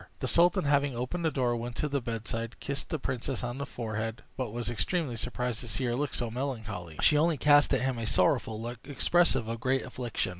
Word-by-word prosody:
The - - -2
sultan, 175 +2 +4
having 140 -2 +2
opened 125 +9 -3
the - - +4
door, 125 -5 +1
went 120 0 -4
to 150 - 0
the 140 -1 -1
bedside, 115 0 -4
kissed 140 0 -3
the 160 - -1
princess 130 -2 -3
on 125 +2 -3
the 140 - -3
forehead, 110 -1 -4
but 125 -4 -3
was 120 0 -3
extremely 130 - -1
surprised 125 0 -2
to 120 - -6
see 100 +3 -1
her 120 -1 +1
look 145 +2 -2
so 120 -3 -2
melancholy. 110 - -4
She 150 -1 +6
only 165 0 +3
cast 145 +2 +5
at 135 - +3
him 130 -2 0
a 115 - -2
sorrowful 120 -6 +2
look, 120 +1 -5
expressive 140 -2 +2
of 115 0 -3
great 130 +2 +1
affliction. 120 -6 -3
125 Hz, 220 wpm, -30 LUFS, 115-140 Hz, -, She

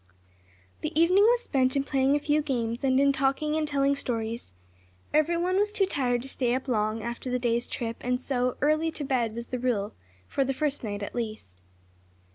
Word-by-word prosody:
The 310 - -1
evening 365 +5 +5
was 480 +1 +4
spent 260 -1 +1
in 275 - +2
playing 275 0 +2
a - - +2
few 295 +1 +1
games, 240 -4 -2
and 260 -1 +3
in 280 0 +4
talking 275 +3 0
and 310 -1 0
telling 280 -1 +2
stories. 230 - -3 0.6
Everyone 340 +4 +2
was 415 +1 +2
too 415 -2 +2
tired 250 -9 0
to - - -7
stay 250 -2 0
up 260 +1 -4
long, 215 -2 0
after 235 +2 -5
the 250 - +1
day's 235 -1 0
trip, 230 -1 -4
and 250 0 0
so 250 -1 -1
"early 310 +3 +2
to 300 - -4
bed" 240 -5 0
was 235 0 -6
the 250 - -3
rule, 225 -5 -1 0.3
for 275 - 0
the 270 0 -2
first 290 -1 -1
night 205 -2 -4
at - - -6
least. 215 - -5
265 Hz, 200 wpm, -27 LUFS, 235-295 Hz, 0.6 s, evening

